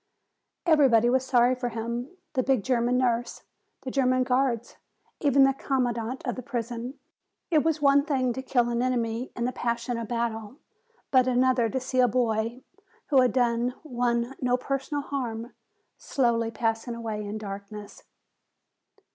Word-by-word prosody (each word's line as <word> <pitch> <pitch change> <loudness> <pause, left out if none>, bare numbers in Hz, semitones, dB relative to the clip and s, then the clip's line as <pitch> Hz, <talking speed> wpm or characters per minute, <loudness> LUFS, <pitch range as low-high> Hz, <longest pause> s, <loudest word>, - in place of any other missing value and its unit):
Everybody 260 -8 +5
was 260 0 +2
sorry 250 -1 +3
for 250 -1 -3
him, 235 +2 -4 0.2
the 260 - +2
big 260 -4 +1
German 245 0 +1
nurse, 245 -1 0 0.4
the 260 - -4
German 255 -1 +2
guards, 250 -2 0 0.4
even 280 -2 +4
the 270 0 +4
commandant 250 -2 -2
of 245 - -1
the 255 - -5
prison. 240 0 -4 0.6
It 310 -3 +4
was 315 -1 0
one 280 0 +5
thing 260 -5 0
to 260 - -4
kill 245 -2 +1
an 235 0 0
enemy 240 -1 -1
in 235 - -2
the 250 - 0
passion 235 0 -2
of 230 - -5
battle, 230 0 -3 0.5
but 255 -1 +5
another 250 -2 +3
to 260 - -1
see 255 0 -2
a 250 - +6
boy, 230 0 0 0.5
who 275 -4 +5
had 255 - +3
done 245 0 +1
one 240 -3 -1
no 250 -1 +2
personal 275 +3 -3
harm, 240 -4 -4 0.5
slowly 235 -3 +1
passing 225 +1 -2
away 220 -2 -4
in 205 +1 -5
darkness. 205 0 -8
245 Hz, 155 wpm, -27 LUFS, 235-260 Hz, 0.6 s, a